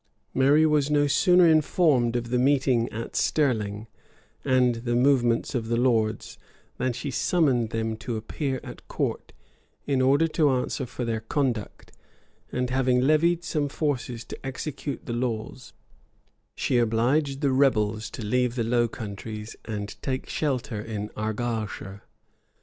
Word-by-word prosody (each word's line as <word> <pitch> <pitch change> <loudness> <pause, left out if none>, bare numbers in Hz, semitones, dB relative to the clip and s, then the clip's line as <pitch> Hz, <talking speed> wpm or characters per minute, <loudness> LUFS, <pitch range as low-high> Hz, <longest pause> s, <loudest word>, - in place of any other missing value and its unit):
[] - - -45
Mary 140 +4 +4
was 150 -2 +2
no 145 -1 +3
sooner 180 +5 +5
informed 150 -6 +3
of 120 -1 -2
the 125 - +2
meeting 130 -3 +2
at 115 +2 -6
Stirling, 110 -8 0 0.6
and 125 -3 +3
the 120 +1 -2
movements 125 -1 +2
of 115 -4 -2
the 115 0 0
lords, 115 -3 0 0.4
than 130 - +1
she 135 +4 -5
summoned 130 -9 +1
them 110 0 -2
to 115 +1 -4
appear 130 +4 -3
at - - -11
court, - - -3 0.5
in 135 -2 +1
order 140 +5 +4
to 155 -2 +2
answer 130 0 -1
for 120 - -5
their 115 -1 -1
conduct; 115 -1 -3 0.6
and 125 0 -2
having 130 -1 +2
levied 165 +5 +3
some 150 -3 -1
forces 125 -6 -2
to - - -10
execute 135 +2 -5
the 120 - -4
laws, 120 0 -4 0.8
she 125 - +1
obliged 130 +5 +1
the 140 -2 +2
rebels 110 -5 +2
to 115 - -7
leave 125 +2 +1
the 120 - 0
low 120 +1 +2
countries, 105 -1 -7
and 105 -2 -6
take 130 -1 -3
shelter 125 -7 -2
in 105 -1 -5
Argyleshire. 110 -2 -4
125 Hz, 145 wpm, -26 LUFS, 115-140 Hz, 0.8 s, sooner